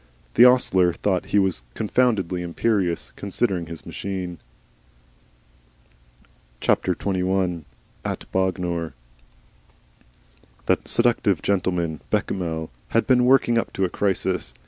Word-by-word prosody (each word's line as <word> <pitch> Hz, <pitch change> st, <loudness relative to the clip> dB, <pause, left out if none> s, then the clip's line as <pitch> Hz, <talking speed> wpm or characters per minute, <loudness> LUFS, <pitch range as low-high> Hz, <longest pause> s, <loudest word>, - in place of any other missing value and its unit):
The 120 Hz, -, +7 dB
ostler 95 Hz, -8 st, +4 dB
thought 95 Hz, -1 st, -1 dB
he -, -, +1 dB
was 95 Hz, -10 st, +1 dB
confoundedly 105 Hz, -6 st, +1 dB
imperious, 90 Hz, 0 st, -1 dB
considering 95 Hz, -4 st, -1 dB
his 85 Hz, -1 st, -8 dB
machine. 90 Hz, -3 st, -5 dB, 2.2 s
XXI. 95 Hz, -3 st, 0 dB, 0.4 s
AT -, -, -5 dB
BOGNOR 90 Hz, -3 st, -1 dB, 1.7 s
That -, -, +1 dB
seductive 115 Hz, -7 st, +2 dB
gentleman, 90 Hz, -5 st, 0 dB
Bechamel, 80 Hz, -4 st, -2 dB, 0.2 s
had 115 Hz, -, +1 dB
been 125 Hz, -2 st, +4 dB
working 125 Hz, -2 st, +4 dB
up -, -, -4 dB
to 95 Hz, -, +1 dB
a -, -, -2 dB
crisis. 95 Hz, -1 st, -1 dB
95 Hz, 100 wpm, -23 LUFS, 85-105 Hz, 2.2 s, The